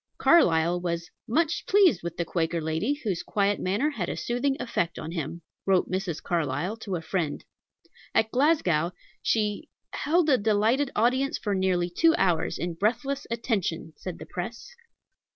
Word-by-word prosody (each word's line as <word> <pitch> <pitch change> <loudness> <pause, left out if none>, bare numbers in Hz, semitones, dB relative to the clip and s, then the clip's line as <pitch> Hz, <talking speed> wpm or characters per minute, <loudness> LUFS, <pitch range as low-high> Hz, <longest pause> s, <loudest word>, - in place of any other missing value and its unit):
Carlyle 175 - +4
was 170 -1 -3 0.2
"much 320 +7 +1
pleased 380 - +5
with 170 0 -5
the 170 - -1
Quaker 170 0 -1
lady, 160 - -1
whose 195 -7 -1
quiet 200 -1 0
manner 205 +12 0
had 190 -11 -3
a - - -3
soothing 270 +3 0
effect 175 -8 -2
on 160 - -5
him," 165 0 -5 0.2
wrote 190 -2 +2
Mrs. 185 -4 -2
Carlyle 170 +4 -1
to 205 -4 -4
a 165 - -4
friend. 160 -3 -2 0.7
At 220 0 +3
Glasgow 185 - +2 0.3
"she 210 -2 0 0.2
held 330 +2 +2
a 265 -4 +4
delighted 220 +6 +2
audience 255 +5 +2
for 205 - -2
nearly 185 -2 +1
two 325 - +4
hours 175 -4 +1
in 175 0 -3
breathless 245 +10 -1
attention," 210 -9 -2
said 185 -3 -7
the - - -9
press. 230 - -6
195 Hz, 155 wpm, -27 LUFS, 170-245 Hz, 0.7 s, pleased